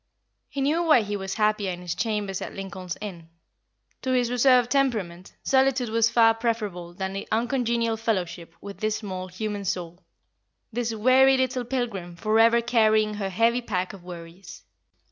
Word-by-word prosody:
He 280 Hz, -, -4 dB
knew 300 Hz, +5 st, +2 dB
why 310 Hz, -8 st, +5 dB
he 205 Hz, 0 st, -3 dB
was 190 Hz, -1 st, -4 dB
happier 210 Hz, -2 st, +1 dB
in 175 Hz, 0 st, -7 dB
his 175 Hz, -1 st, -3 dB
chambers 210 Hz, -4 st, -2 dB
at -, -, -6 dB
Lincoln's 190 Hz, -2 st, -6 dB
Inn. 175 Hz, -6 st, -8 dB, 0.7 s
To 260 Hz, -, -3 dB
his 245 Hz, -1 st, +1 dB
reserved 250 Hz, -1 st, +4 dB
temperament, 210 Hz, -11 st, -1 dB
solitude 265 Hz, -2 st, +2 dB
was 230 Hz, 0 st, +3 dB
far 230 Hz, -1 st, +5 dB
preferable 210 Hz, -7 st, -3 dB
than 190 Hz, +1 st, -4 dB
uncongenial 235 Hz, -1 st, 0 dB
fellowship 180 Hz, -7 st, -3 dB
with 200 Hz, -1 st, -9 dB
this 215 Hz, 0 st, 0 dB
small 185 Hz, -3 st, -6 dB
human 205 Hz, +2 st, -4 dB
soul, 175 Hz, -1 st, -4 dB, 0.7 s
this 235 Hz, 0 st, -1 dB
weary 255 Hz, +4 st, +5 dB
little 255 Hz, -1 st, -1 dB
pilgrim 230 Hz, -9 st, -3 dB
forever 225 Hz, +5 st, +3 dB
carrying 220 Hz, -2 st, +3 dB
her 200 Hz, -2 st, -3 dB
heavy 230 Hz, +5 st, +2 dB
pack 185 Hz, -4 st, -3 dB
of 190 Hz, -3 st, -12 dB
worries. 170 Hz, -1 st, -11 dB
215 Hz, 155 wpm, -25 LUFS, 190-240 Hz, 0.7 s, why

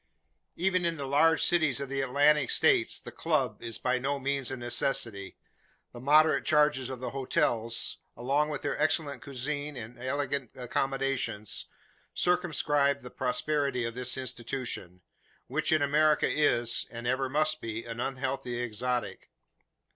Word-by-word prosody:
Even 185 Hz, +1 st, +1 dB
in 170 Hz, -1 st, 0 dB
the 140 Hz, -, -4 dB
larger 160 Hz, +4 st, +4 dB
cities 160 Hz, -7 st, +2 dB
of 140 Hz, -, -4 dB
the 135 Hz, +1 st, -2 dB
Atlantic 140 Hz, +2 st, +3 dB
states -, -, +3 dB
the -, -, -10 dB
"club" -, -, -1 dB
is 115 Hz, -, -4 dB
by 125 Hz, 0 st, 0 dB
no 140 Hz, +2 st, -1 dB
means 135 Hz, -1 st, -1 dB
a 130 Hz, -, -4 dB
necessity. 120 Hz, -4 st, -2 dB, 0.6 s
The 120 Hz, -, -9 dB
moderate 155 Hz, +4 st, +4 dB
charges 150 Hz, -4 st, +3 dB
of 130 Hz, -2 st, -5 dB
the 125 Hz, -, -4 dB
hotels, 125 Hz, -4 st, 0 dB, 0.2 s
along 140 Hz, +5 st, +1 dB
with 145 Hz, -2 st, -4 dB
their -, -, -1 dB
excellent 155 Hz, -2 st, 0 dB
cuisine 145 Hz, +2 st, -3 dB
and 120 Hz, +1 st, -9 dB
elegant 140 Hz, 0 st, -2 dB
accommodations, 135 Hz, -4 st, -1 dB, 0.5 s
circumscribe 150 Hz, -5 st, +2 dB
the 125 Hz, -, -10 dB
prosperity 140 Hz, 0 st, -1 dB
of 115 Hz, -, -3 dB
this 125 Hz, +1 st, -2 dB
institution; 120 Hz, -7 st, -5 dB, 0.4 s
which -, -, -1 dB
in 155 Hz, -2 st, +4 dB
America 150 Hz, +1 st, +3 dB
is, 120 Hz, -6 st, +1 dB
and 120 Hz, 0 st, -8 dB
ever 130 Hz, +2 st, 0 dB
must 155 Hz, +2 st, +1 dB
be, 115 Hz, 0 st, -5 dB
an 115 Hz, 0 st, -6 dB
unhealthy 130 Hz, -1 st, -2 dB
exotic. 120 Hz, +1 st, -3 dB
135 Hz, 145 wpm, -29 LUFS, 125-150 Hz, 0.6 s, larger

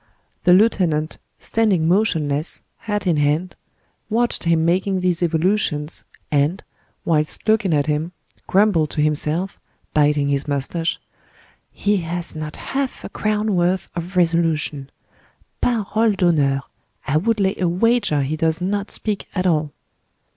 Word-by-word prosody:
The 180 Hz, -, +7 dB
lieutenant, 180 Hz, -6 st, +2 dB, 0.2 s
standing 200 Hz, -8 st, +1 dB
motionless, 160 Hz, -6 st, 0 dB
hat 210 Hz, -2 st, -3 dB
in 170 Hz, -4 st, +2 dB
hand, 150 Hz, +5 st, 0 dB, 0.5 s
watched 235 Hz, -3 st, 0 dB
him 165 Hz, -1 st, +2 dB
making 185 Hz, +3 st, +1 dB
these 180 Hz, -2 st, 0 dB
evolutions, 165 Hz, -2 st, 0 dB, 0.3 s
and, 150 Hz, +6 st, +1 dB, 0.4 s
whilst 155 Hz, +4 st, 0 dB
looking 215 Hz, -4 st, +3 dB
at 145 Hz, -2 st, +2 dB
him, 155 Hz, +2 st, -1 dB, 0.4 s
grumbled 190 Hz, -6 st, +3 dB
to 150 Hz, -, -2 dB
himself, 155 Hz, +5 st, -1 dB, 0.3 s
biting 145 Hz, -1 st, +2 dB
his 140 Hz, 0 st, 0 dB
mustache: 145 Hz, +4 st, -2 dB, 0.7 s
"He 205 Hz, 0 st, 0 dB
has 170 Hz, -1 st, -3 dB
not 155 Hz, -1 st, -5 dB
half 270 Hz, -1 st, -3 dB
a -, -, -6 dB
crown 215 Hz, 0 st, -1 dB
worth 180 Hz, +2 st, +1 dB
of 175 Hz, +2 st, -5 dB
resolution! 165 Hz, -5 st, +1 dB, 0.7 s
Parole 220 Hz, -1 st, +1 dB
d'honneur! 145 Hz, -7 st, +2 dB, 0.4 s
I 145 Hz, +2 st, +1 dB
would 220 Hz, +6 st, +1 dB
lay 195 Hz, -1 st, +2 dB
a 180 Hz, -, +1 dB
wager 195 Hz, -, +2 dB
he 145 Hz, +4 st, -2 dB
does 160 Hz, 0 st, 0 dB
not 200 Hz, +3 st, -2 dB
speak 210 Hz, -2 st, -3 dB
at 185 Hz, -1 st, 0 dB
all!" 155 Hz, -4 st, +1 dB
170 Hz, 135 wpm, -21 LUFS, 155-200 Hz, 0.7 s, The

